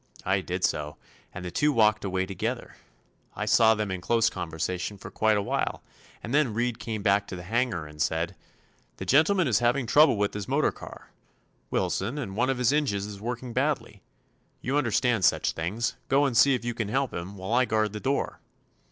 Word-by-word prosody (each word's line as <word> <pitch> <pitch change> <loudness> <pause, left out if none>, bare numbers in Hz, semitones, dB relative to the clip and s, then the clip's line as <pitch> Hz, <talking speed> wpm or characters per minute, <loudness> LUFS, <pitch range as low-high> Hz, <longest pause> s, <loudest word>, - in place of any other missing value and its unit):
I 95 +1 +2
did 90 0 -4
so, 75 0 -1 0.3
and 90 0 -7
the 90 - -5
two 150 - +2
walked 110 -4 +3
away 95 -1 -1
together. 95 0 -4 0.6
I 105 - -3
saw 110 +1 +5
them 105 -2 -2
in 95 -1 -4
close 115 +3 +2
conversation 90 +5 -4
for 100 - -10
quite 110 -1 +2
a 100 - 0
while, - - -2 0.4
and 115 - -5
then 140 -7 +2
Reed 120 0 -1
came 110 -3 -4
back 100 0 +2
to - - -6
the 90 - -8
hangar 115 -4 -1
and 75 0 -9
said: 85 +4 0 0.6
'The - - -6
gentleman 170 +5 +4
is 115 -4 +3
having 120 +2 +1
trouble 145 +1 +5
with 100 0 0
his 105 -2 -5
motor - - +2
car, - - -12 0.6
Wilson, 115 +9 -1
and 110 -10 -5
one 125 +4 +1
of 135 - 0
his 125 +2 +2
engines 125 -10 0
is 100 -1 -8
working 120 +1 -5
badly. 130 -7 -1 0.6
You 130 +3 -2
understand 120 -4 +1
such - - +3
things; 105 +9 -2
go 140 +1 +4
and 130 -4 -1
see 135 +5 +6
if 120 - -5
you 120 - -1
can 110 -2 -3
help 135 +4 -1
him, 90 +4 -6
while 95 +4 -4
I 130 +1 +4
guard 110 -2 0
the 105 - -4
door. 135 +5 -1
110 Hz, 205 wpm, -27 LUFS, 95-125 Hz, 0.6 s, see